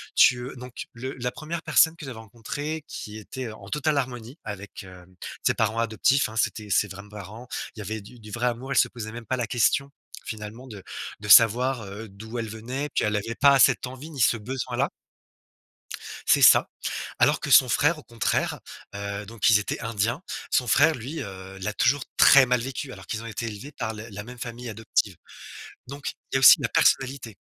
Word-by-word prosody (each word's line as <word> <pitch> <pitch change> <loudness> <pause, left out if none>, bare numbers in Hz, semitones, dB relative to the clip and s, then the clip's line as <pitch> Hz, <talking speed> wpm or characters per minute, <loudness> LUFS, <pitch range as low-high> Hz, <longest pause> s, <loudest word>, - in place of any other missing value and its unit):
tu, 125 - +6
heu - - -10
donc 125 0 -8
le 130 +3 -6
la 125 0 -1
1re 160 +4 -5
personne 160 0 +4
que 155 - -8
j'avais 125 -4 -7
rencontrée 135 +8 -6
qui 105 0 -7
était, 125 +4 -7
heu, 110 - -7
en 100 -2 -13
totale 150 +2 0
harmonie 125 +1 -4
avec, 100 +1 -7
heu, 90 -1 -13 0.4
ses - - +4
parents 110 0 0
adoptifs, 115 +4 +2
hein. 110 - -9
C'étaient 110 -1 -1
ses 105 +1 +3
vrais 100 +1 -9
parents. 105 +4 -10 0.3
Il 110 - -11
y - - -4
avait 110 +3 -4
du 120 +5 -14
du 110 -1 -12
vrai 120 +3 -2
amour. 125 +3 -3
Elle - - 0
se - - +5
posait 110 -3 -7
même 120 0 -8
pas 130 - -1
la 120 - -2
question 125 +4 +1 0.3
finalement 110 +4 -7
de 105 -5 -10 0.4
de 105 - -8
savoir, 120 +3 +6
heu, 105 +3 -8
d'où 110 +4 -8
elle 115 - -3
venait, 125 +7 -4
puis - - +2
elle 105 0 0
avait 115 +3 -4
pas 140 0 +5
cette 125 -1 +4
envie, 130 +5 -9
ni 140 -5 -4
ce 115 - +4
besoin-là 125 +3 -2 1.4
c'est - - +4
ça. - - +7 0.5
Alors - - +3
que - - -4
son 130 - +7
frère, 150 +6 +2
au - - -11
contraire, 115 -4 -1 0.3
heu 100 0 -5
donc 115 0 +1
ils 105 - +6
étaient 105 - -4
indiens. 115 - -1 0.3
Son 125 - +2
frère, 155 +6 +4
lui, 135 +6 -6
heu, 95 0 -9
l'a 100 +3 -3
toujours 135 +5 +2
très 135 -2 +8
mal 125 0 +2
vécu 135 +2 -5
alors 95 -4 -11
qu'ils 110 +3 -4
ont 115 - -8
été 115 +1 -4
élevés 115 +7 -7
par 110 -6 -4
le 110 +2 -8
la 105 0 -7
même 125 +2 -11
famille 120 +1 -6
adoptive. 105 -3 -1 0.7
Donc 140 +1 -5 0.2
il - - -2
y - - +6
a - - +1
aussi 135 +4 +9
la 120 - -1
personnalité. 130 -4 +1
115 Hz, 210 wpm, -25 LUFS, 105-130 Hz, 1.4 s, aussi